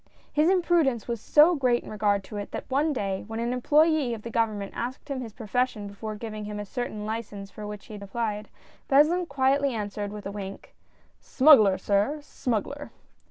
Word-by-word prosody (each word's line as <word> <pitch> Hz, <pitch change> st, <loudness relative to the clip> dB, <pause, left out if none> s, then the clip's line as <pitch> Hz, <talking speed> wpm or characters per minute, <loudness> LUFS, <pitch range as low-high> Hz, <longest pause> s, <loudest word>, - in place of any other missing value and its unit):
His 305 Hz, +3 st, +4 dB
imprudence 340 Hz, -, +2 dB
was 235 Hz, -3 st, -3 dB
so 310 Hz, +8 st, +6 dB
great 250 Hz, -6 st, +1 dB
in -, -, -9 dB
regard 205 Hz, -2 st, +1 dB
to 210 Hz, +2 st, -8 dB
it, 205 Hz, -, -5 dB
that -, -, -5 dB
one 295 Hz, +4 st, +2 dB
day 195 Hz, -8 st, -2 dB
when 225 Hz, 0 st, -5 dB
an 235 Hz, +1 st, -1 dB
employ^ 295 Hz, 0 st, +3 dB
of 215 Hz, -, -11 dB
the 235 Hz, -, -6 dB
Government 215 Hz, -4 st, -1 dB
asked 255 Hz, +5 st, -5 dB
him 270 Hz, -2 st, -3 dB
his 230 Hz, -3 st, -7 dB
profession 225 Hz, -1 st, -1 dB
before 215 Hz, +2 st, -6 dB
giving 215 Hz, -1 st, -6 dB
him 210 Hz, 0 st, -5 dB
a 205 Hz, -, -4 dB
certain 215 Hz, -1 st, -4 dB
license 210 Hz, -3 st, -5 dB
for 210 Hz, 0 st, -8 dB
which 210 Hz, -1 st, -8 dB
he 220 Hz, -, -11 dB
had 205 Hz, -, -8 dB
applied, 210 Hz, 0 st, -3 dB, 0.4 s
Beslin 320 Hz, +6 st, +4 dB
quietly 275 Hz, -1 st, +1 dB
answered 205 Hz, -1 st, -4 dB
with 210 Hz, -1 st, -8 dB
a 195 Hz, -, -4 dB
wink; 195 Hz, -1 st, -8 dB, 0.3 s
" -, -, -37 dB, 0.2 s
Smuggler, 255 Hz, -9 st, +7 dB
sir, 205 Hz, +9 st, +1 dB
smuggler 275 Hz, +2 st, -3 dB
230 Hz, 195 wpm, -27 LUFS, 205-275 Hz, 0.4 s, Smuggler